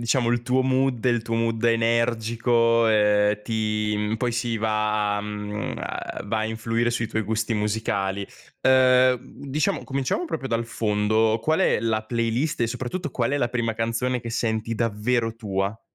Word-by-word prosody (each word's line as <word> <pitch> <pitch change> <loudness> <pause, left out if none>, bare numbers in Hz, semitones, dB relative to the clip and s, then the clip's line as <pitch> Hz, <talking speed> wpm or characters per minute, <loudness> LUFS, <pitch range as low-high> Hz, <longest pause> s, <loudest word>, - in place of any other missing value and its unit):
diciamo 120 +1 +1
il 120 0 +1
tuo 125 +2 +1
mood, 130 -2 +1
il 120 -2 +2
tuo 115 0 -3
mood 115 0 0
energico, 115 0 +2
ehm, 105 -1 +3
ti 105 -1 -1
mhmm, 105 +1 -1
poi 120 +1 -1
si 120 -1 -1
va, 105 -1 0
mhmm, 105 0 -4
a - - -5
va 110 - -1
a - - -1
influire 115 +1 -1
sui 115 -1 -1
tuoi 110 - -1
gusti 110 +2 -1
musicali. 100 -2 -1 0.3
Ehm, 130 -1 +5
mhmm, 140 +3 -13
diciamo 145 +2 0
cominciamo 140 - -2
proprio 135 - -4
dal 115 0 0
fondo: 110 0 +1
qual 160 +6 +1
è 185 - +3
la 110 -1 0
playlist 115 +5 -1
e 115 - +3
soprattutto 130 +7 -4
qual 120 -1 -1
è 145 - 0
la 120 -3 +1
prima 120 -2 -1
canzone 115 +3 -1
che 115 - -7
senti 115 0 -1
davvero 115 +1 0
tua? 100 -1 -3
115 Hz, 170 wpm, -24 LUFS, 110-120 Hz, 0.3 s, Ehm